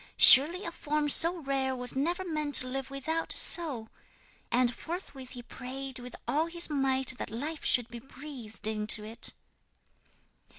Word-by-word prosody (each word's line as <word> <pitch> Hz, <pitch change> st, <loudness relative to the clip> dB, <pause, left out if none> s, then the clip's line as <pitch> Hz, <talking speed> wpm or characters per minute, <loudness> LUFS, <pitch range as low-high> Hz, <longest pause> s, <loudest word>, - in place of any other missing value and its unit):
"Surely 340 Hz, +8 st, +8 dB
a 335 Hz, -, -5 dB
form 300 Hz, -2 st, -3 dB
so 335 Hz, +5 st, +6 dB
rare 270 Hz, -3 st, -3 dB
was 250 Hz, 0 st, -7 dB
never 345 Hz, +7 st, -3 dB
meant 305 Hz, -4 st, -4 dB
to -, -, +7 dB
live 270 Hz, +1 st, -6 dB
without 315 Hz, +4 st, -4 dB
a -, -, +2 dB
soul." 270 Hz, -10 st, +2 dB, 0.6 s
And 245 Hz, 0 st, +1 dB
forthwith 290 Hz, -6 st, -9 dB
he 245 Hz, -2 st, -11 dB
prayed 260 Hz, +2 st, -9 dB
with 250 Hz, 0 st, -11 dB
all 310 Hz, +3 st, -1 dB
his 340 Hz, -1 st, -1 dB
might 265 Hz, -2 st, -1 dB
that -, -, -6 dB
life 290 Hz, +8 st, -7 dB
should 245 Hz, -2 st, +2 dB
be 235 Hz, -, -10 dB
breathed 260 Hz, -4 st, -12 dB
into 215 Hz, 0 st, -2 dB
it. 220 Hz, +2 st, 0 dB
270 Hz, 160 wpm, -28 LUFS, 250-310 Hz, 0.6 s, Surely